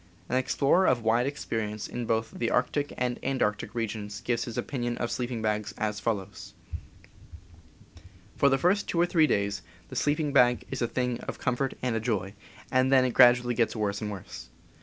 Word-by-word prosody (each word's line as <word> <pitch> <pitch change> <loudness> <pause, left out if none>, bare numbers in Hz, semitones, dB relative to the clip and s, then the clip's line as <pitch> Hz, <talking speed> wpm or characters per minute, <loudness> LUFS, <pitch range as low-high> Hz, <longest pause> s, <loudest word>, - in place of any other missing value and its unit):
An - - 0
explorer 140 +7 +2
of 120 -3 +2
wide 115 +3 +2
experience 110 -7 -3
both 115 -2 -2
in - - -10
the 115 - 0
arctic 140 +4 0
and 125 -1 -1
antarctic 130 -7 -1
regions 105 -3 -4
gives 120 -1 -1
his 120 - -7
opinion 120 -4 -2
of 120 - -2
sleeping 120 -2 -3
bags 105 -1 -1
as 105 -1 -2
follows: 100 -4 -4 1.8
For 140 - +4
the 135 - +3
first 185 +8 +2
two 170 - 0
or 175 - +5
three 165 -3 +3
days 100 -4 0 0.3
the - - -8
sleeping 150 0 0
bag 125 -3 +4
is - - -4
a 120 - +2
thing 125 0 -2
of - - -4
comfort 130 +2 -1
and 125 -3 0
a - - +1
joy, 105 -4 -2 0.4
and 130 +1 +3
then 130 -1 +5
it 125 - 0
gradually 120 -1 +6
gets 115 0 +1
worse 105 -2 -2
and 105 - -3
worse. 100 -3 -8
120 Hz, 185 wpm, -28 LUFS, 110-130 Hz, 1.8 s, gradually